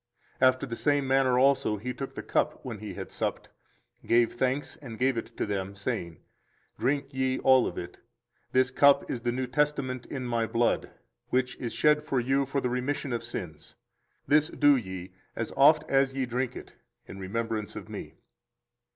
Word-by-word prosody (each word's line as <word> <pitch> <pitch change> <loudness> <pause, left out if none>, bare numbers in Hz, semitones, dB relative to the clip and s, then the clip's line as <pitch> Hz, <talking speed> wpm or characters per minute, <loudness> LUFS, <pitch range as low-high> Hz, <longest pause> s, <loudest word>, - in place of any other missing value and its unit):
After 130 0 +4
the 115 -3 -5
same 145 +1 +1
manner 130 -1 +3
also 130 -5 +3
He 125 +5 -4
took 135 +1 -6
the - - -5
cup - - -1
when 115 -5 -5
He 105 0 -7
had - - -7
supped, - - -3 0.5
gave 120 0 +3
thanks, 130 +3 -1
and 115 -6 -9
gave 130 +1 +2
it 115 - -6
to - - 0
them, 100 -1 -3
saying, 85 -4 -3 0.6
Drink 135 +4 0
ye 130 0 0
all 130 -1 +5
of 85 - -6
it; 85 0 -7 0.5
this 130 0 +3
cup 140 +2 +5
is 120 - -3
the 120 0 0
new 130 +1 -2
testament 130 -1 -1
in 130 -3 -5
My 115 -2 0
blood, 115 +2 +1 0.4
which 125 0 0
is 120 -3 -4
shed 150 0 +3
for 135 -3 0
you 135 +2 +1
for 140 +1 -1
the 125 - -1
remission 130 +1 -2
of 115 -1 -2
sins: 85 -9 -7 0.5
this 150 +1 +4
do 145 -3 +4
ye, 95 -6 -5 0.2
as 115 - -4
oft 150 +3 +6
as 135 -1 +2
ye 135 -1 0
drink 125 +1 -2
it, - - -10 0.3
in 95 - -9
remembrance 110 +2 -3
of - - -7
Me. - - -8
125 Hz, 185 wpm, -28 LUFS, 115-135 Hz, 0.6 s, oft